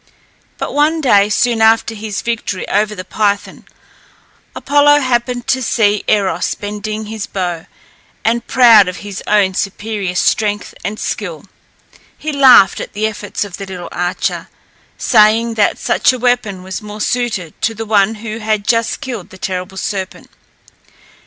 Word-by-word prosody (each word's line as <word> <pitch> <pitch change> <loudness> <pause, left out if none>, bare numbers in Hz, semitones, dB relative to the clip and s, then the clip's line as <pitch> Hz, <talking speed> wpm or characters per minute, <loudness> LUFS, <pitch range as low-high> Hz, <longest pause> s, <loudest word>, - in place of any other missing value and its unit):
But - - -4
one 300 +3 +2
day, 205 -8 +4
soon 230 +1 +1
after 225 +1 +3
his 215 -2 -5
victory 230 -5 -3
over 210 +1 0
the 185 -2 -7
Python, 205 +1 -2 0.9
Apollo 290 +1 +4
happened 245 -1 -1
to 260 - 0
see 210 -4 +1
Eros 200 -3 +1
bending 210 +1 -5
his 215 -1 -6
bow, 175 -4 -4 0.6
and 235 +1 0
proud 230 -6 +6
of 180 - -4
his 200 -2 -6
own 205 -3 +3
superior 200 -1 -3
strength 205 +2 0
and 205 +3 -4
skill, 175 -6 -4 0.7
he 310 - -4
laughed 265 -8 +6
at - - -7
the 210 +2 -1
efforts 210 -1 -3
of 195 - -9
the 195 - -6
little 180 -2 -7
archer, 180 0 -2 0.5
saying 225 0 +3
that 215 -2 +1
such - - +2
a 255 - -4
weapon 240 -6 0
was 190 +2 -6
more 210 0 -9
suited 215 -9 -2
to 225 - 0
the 225 +1 -5
one 215 0 +2
who 220 0 -5
had 215 -2 -1
just 230 -1 +1
killed 240 -9 -6
the 190 - -13
terrible 185 0 -5
serpent. 190 -1 -5
215 Hz, 150 wpm, -16 LUFS, 195-230 Hz, 0.9 s, proud